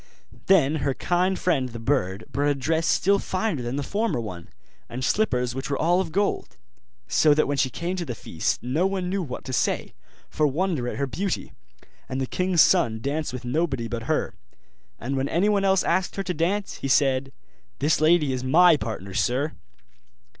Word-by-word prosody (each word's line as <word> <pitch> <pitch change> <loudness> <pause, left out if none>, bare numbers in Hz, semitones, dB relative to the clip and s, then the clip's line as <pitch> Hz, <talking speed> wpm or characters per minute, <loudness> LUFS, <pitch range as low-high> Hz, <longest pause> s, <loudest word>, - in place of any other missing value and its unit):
Then 160 -6 +4
her 135 -2 -1
kind 180 +2 0
friend 140 -8 0
the 115 - -8
bird 110 -5 -1
brought 145 +1 0
a 145 - +1
dress 160 +4 0
still 200 +2 +3
finer 185 - -2
than 120 +2 -3
the 145 - -2
former 210 - -1
one, 90 -7 -7 0.4
and 125 +1 -4
slippers 125 - +1
which 135 +3 -5
were 140 - -1
all 175 +3 +2
of 170 -4 -5
gold: 200 +4 -1 0.5
so 150 -2 +4
that 155 - +2
when 145 0 -1
she 130 - +2
came 170 +7 -3
to 175 - -3
the 120 - -5
feast 80 -6 -2
no 150 +10 +1
one 190 -2 -2
knew 195 0 -1
what 135 -8 -6
to 130 - -5
say, - - -1 0.3
for 150 - +1
wonder 155 -3 -1
at - - -3
her 140 - 0
beauty: 185 +8 -3 0.6
and 130 - -3
the 135 - 0
king's 180 +4 +2
son 115 -12 +2
danced 145 +6 -2
with 125 -1 -7
nobody 135 -3 -1
but 115 -1 -5
her; - - 0 0.7
and 130 +4 -3
when 135 +1 -1
anyone 200 +3 +2
else 190 -1 +3
asked 185 -1 0
her 195 - -2
to 180 -1 -2
dance, 185 +5 -1
he - - -4
said, 135 -1 +2 0.5
'This 150 +2 +1
lady 155 -3 +4
is 130 0 -3
my 170 +6 +6
partner, 105 -5 -6
sir. 135 +9 0
145 Hz, 195 wpm, -25 LUFS, 130-180 Hz, 0.7 s, my